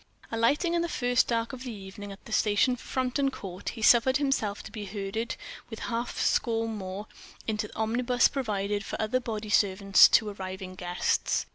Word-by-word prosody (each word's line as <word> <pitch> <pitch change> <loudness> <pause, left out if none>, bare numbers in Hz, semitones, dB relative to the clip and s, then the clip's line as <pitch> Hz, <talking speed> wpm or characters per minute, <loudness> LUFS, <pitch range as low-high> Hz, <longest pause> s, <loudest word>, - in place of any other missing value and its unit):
Alighting 280 +10 +2
in 340 - +2
the 340 - -2
first 245 -4 +2
dark 230 +1 -1
of 260 0 -7
evening 205 -2 -8
at 195 - -12
the - - -11
station 215 +4 +3
for 250 - -14
Frampton 260 +2 0
Court, 195 -6 -6
he 225 - -7
suffered 245 +4 +6
himself 270 -8 -1
to - - -10
be 210 -3 -6
herded, 200 +3 -3 0.3
with 225 - -7
a - - -7
half 235 +1 -3
score 225 -1 +1
more, 200 -2 -5 0.4
into 210 -1 -2
the - - -16
omnibus 240 +3 +2
provided 205 -6 -2
for - - -5
other 220 +4 +1
bodyservants 205 -4 +4
to 215 - +4
arriving 190 -1 -6
guests. 180 -1 0
220 Hz, 175 wpm, -28 LUFS, 200-245 Hz, 0.4 s, suffered